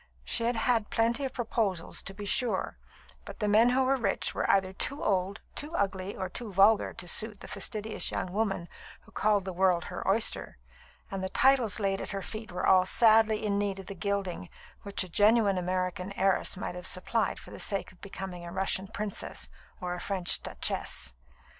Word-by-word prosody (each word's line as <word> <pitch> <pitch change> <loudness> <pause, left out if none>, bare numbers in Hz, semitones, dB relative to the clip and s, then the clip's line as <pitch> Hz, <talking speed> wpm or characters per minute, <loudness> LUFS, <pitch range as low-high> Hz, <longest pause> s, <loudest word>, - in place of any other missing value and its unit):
She 230 - +1
had 240 +1 +1
had 225 -1 +1
plenty 235 +4 +1
of 265 - -4
proposals, 215 -7 -1
to 195 - -7
be 205 0 -7
sure; 245 +4 0 0.5
but - - -10
the 210 - 0
men 220 +4 +5
who 260 +2 +3
were 265 +1 +3
rich 250 - 0
were - - -1
either 190 -1 +3
too 280 +8 -2
old, 195 +1 0
too 305 +3 -4
ugly, 195 -1 -1
or 190 - -2
too 215 +4 -6
vulgar 200 +3 +4
to 175 - -6
suit 210 +3 0
the - - -8
fastidious 215 -1 0
young 180 - -3
woman 195 -5 -1 0.3
who - - -20
called 205 -2 +1
the 190 - -4
world 180 -1 +2
her - - -4
oyster; 200 - 0 0.5
and 195 -1 -3
the 190 - -2
titles 250 -2 +3
laid 195 -1 0
at - - -5
her 195 - -5
feet 215 -2 -7
were 180 - -2
all 185 -1 +5
sadly 220 -1 +4
in 200 -1 +1
need 200 -1 -1
of 195 - -8
the 200 - -6
gilding 190 - -3 0.3
which 200 -1 +2
a - - -7
genuine 205 +1 +4
American 185 +1 -2
heiress 195 0 +1
might 195 - -4
have 180 +1 -3
supplied 220 +5 0
for - - -12
the - - -9
sake 195 -3 0
of 185 - -23
becoming 190 -3 -7
a 170 - -7
Russian 190 +1 0
princess 210 -1 -3 0.3
or 180 -1 -3
a 180 - -5
French 185 -2 +1
duchesse. 65 - -2
200 Hz, 195 wpm, -29 LUFS, 185-220 Hz, 0.5 s, men